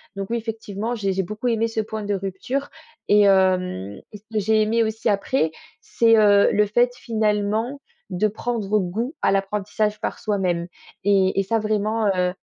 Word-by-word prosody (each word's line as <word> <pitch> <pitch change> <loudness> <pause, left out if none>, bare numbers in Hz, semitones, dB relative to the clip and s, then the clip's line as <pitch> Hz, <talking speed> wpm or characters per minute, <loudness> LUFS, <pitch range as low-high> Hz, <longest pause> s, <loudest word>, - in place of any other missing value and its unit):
Donc 195 +1 -5
oui, 235 - +1
effectivement 220 0 -4
j'ai 195 -3 -1
j'ai 190 0 -1
beaucoup 215 +6 -4
aimé 230 0 +1
ce 225 -1 -4
point 215 0 -5
de 205 - -1
rupture 195 +9 -4 0.4
et 210 0 +5
hem 185 - +2
et 210 - -9
ce 200 - -24
que 215 - +1
j'ai 220 +2 +2
aimé 230 +2 +2
aussi 220 0 -1
après, 200 -3 +1 0.3
c'est, 225 -1 +3
heu, 205 -1 +5
le 210 - +3
fait 240 +4 +2
finalement 220 +4 -1 0.3
de 185 +4 +1
prendre 215 -1 -1
goût 225 - -3
à - - +3
l'apprentissage 210 +2 -1
par - - -3
soi-même. 180 -5 -1 0.4
Et 195 -1 +3
et 195 - +2
ça 225 +4 0
vraiment, 215 +1 0
heu 180 0 0
210 Hz, 180 wpm, -22 LUFS, 195-225 Hz, 0.4 s, et